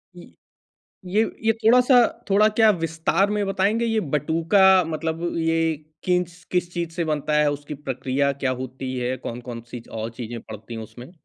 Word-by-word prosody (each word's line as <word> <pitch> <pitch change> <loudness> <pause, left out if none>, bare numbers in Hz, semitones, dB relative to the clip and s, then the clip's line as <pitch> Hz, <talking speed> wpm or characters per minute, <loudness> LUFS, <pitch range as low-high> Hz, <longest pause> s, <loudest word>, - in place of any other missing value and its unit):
ये 175 - -14 0.8
ये 210 +3 +3 0.2
ये 225 - +4
थोड़ा-सा 250 +3 +5 0.3
थोड़ा 205 +2 +5
क्या 220 -1 +7
विस्तार 165 +5 +1
में 210 -1 0
बताएँगे, 200 +4 +1
ये 225 -1 +1
बटूका 165 +4 +3
मतलब 160 +1 -3 0.2
ये 165 0 +1 0.3
किस-किस 180 0 -1
चीज़ 170 -2 -2
से 170 - -1
बनता 150 -1 -1
है, 150 -1 +4
उसकी 145 +1 -6
प्रक्रिया 135 +2 0
क्या 130 - +2
होती 130 0 -6
है? 125 +1 -1
कौन-कौन 120 -1 -7
सी 120 - -6 0.2
और 110 +1 -3
चीज़ें 115 0 -6
पड़ती 110 +1 -10
हैं 110 - -5
उसमें? 125 +6 -12
160 Hz, 160 wpm, -23 LUFS, 130-190 Hz, 0.8 s, क्या